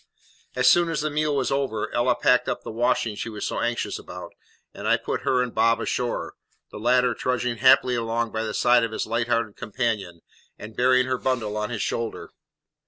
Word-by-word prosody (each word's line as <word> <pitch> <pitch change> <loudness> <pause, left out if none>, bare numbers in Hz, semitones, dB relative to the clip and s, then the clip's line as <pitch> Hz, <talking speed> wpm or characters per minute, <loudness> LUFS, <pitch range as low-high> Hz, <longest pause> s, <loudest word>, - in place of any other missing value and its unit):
As 125 0 +2
soon 175 +4 +5
as 160 -3 -1
the 155 0 -2
meal 150 0 0
was 135 -2 0
over 135 -6 -2
Ella 120 +1 +2
packed 125 - +2
up - - -3
the - - -6
washing 115 -1 0
she 115 - -5
was 105 -2 -5
so - - -2
anxious 120 0 -2
about, - - -9 0.4
and - - -6
I - - +4
put - - -4
her 125 -1 +2
and 125 - -5
Bob 115 +1 +3
ashore, 120 -1 -2 0.4
the - - -8
latter 125 +2 +3
trudging 125 0 -2
happily 130 0 +5
along 115 -1 -1
by 110 - -2
the 110 -1 -3
side 120 -1 +4
of 115 -1 -2
his - - -2
light 115 +1 -1
hearted 115 -3 -1
companion, 105 -7 -3 0.4
and 110 +1 -10
bearing 130 +1 +3
her 130 -1 -2
bundle 120 -5 -1
on 105 0 -2
his 115 -3 -3
shoulder. 115 -1 -4
120 Hz, 205 wpm, -24 LUFS, 115-125 Hz, 0.4 s, soon